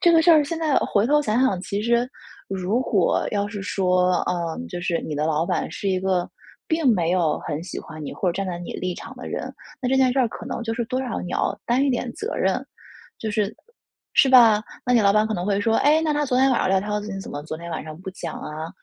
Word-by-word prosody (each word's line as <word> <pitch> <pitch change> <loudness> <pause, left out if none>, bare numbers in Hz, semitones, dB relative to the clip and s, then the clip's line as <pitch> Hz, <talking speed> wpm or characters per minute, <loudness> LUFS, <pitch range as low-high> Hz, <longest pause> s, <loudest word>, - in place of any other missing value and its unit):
这 345 - +5
个 325 - +6
事 340 - +6
儿 310 -2 +7
现 320 +3 -4
在， 315 -2 0
呃， - - +2
回 205 +2 +2
头 295 +2 +4
想 230 -2 +1
想， 195 -9 +2
其 200 +2 -3
实 235 +2 +2 0.4
如 195 +5 -1
果 200 -8 +1
要 205 -1 0
是 205 -2 -6
说， 185 -2 +2
嗯， 175 +6 -2
就 175 -1 -5
是 170 -1 -1
你 155 - -4
的 150 +1 0
老 160 0 +1
板 - - -1
是 200 - -3
一 185 -1 +1
个 185 -2 0 0.4
并 320 -4 +1
没 170 -3 0
有 175 -4 +2
很 150 +1 -4
喜 180 - -6
欢 155 - -10
你， - - -5
或 185 - -1
者 - - -3
站 195 +2 -3
在 175 -2 -4
你 175 - -7
立 185 -1 -3
场 - - -9
的 - - -7
人， - - -4 0.3
那 250 - 0
这 265 - +2
件 260 -1 +4
事 270 - -1
儿 245 - +3
可 225 - -9
能 255 -2 -4
就 225 - -2
是 235 - -1
多 255 +1 -1
少 250 -3 -3
你 180 - -6
要 - - -1
担 250 +3 +2
一 280 - +2
点 245 -1 -1
责 440 +4 -4
任。 - - 0 0.5
就 220 - -3
是 210 -1 -1 0.6
是 270 - +6
吧？ 230 -5 +7 0.2
那 250 - +1
你 235 - +5
老 200 -1 +5
板 215 +1 +3
可 220 - -2
能 180 -1 -3
会 200 -1 +1
说： 225 +1 +1
“哎， 305 +2 +4
那 310 -2 +1
他 295 - 0
昨 255 -1 +1
天 270 +1 +5
晚 250 - +2
上 - - +1
撂 190 - +4
挑 210 +1 -2
子， 210 0 -7
你 195 - -4
怎 - - -8
么 145 0 -5
昨 155 0 -5
天 170 +1 -8
晚 - - -3
上 155 0 -9
不 190 - -5
讲 185 - -6
啊？” 155 +2 -6
210 Hz, 300 characters per minute, -23 LUFS, 180-255 Hz, 0.6 s, 儿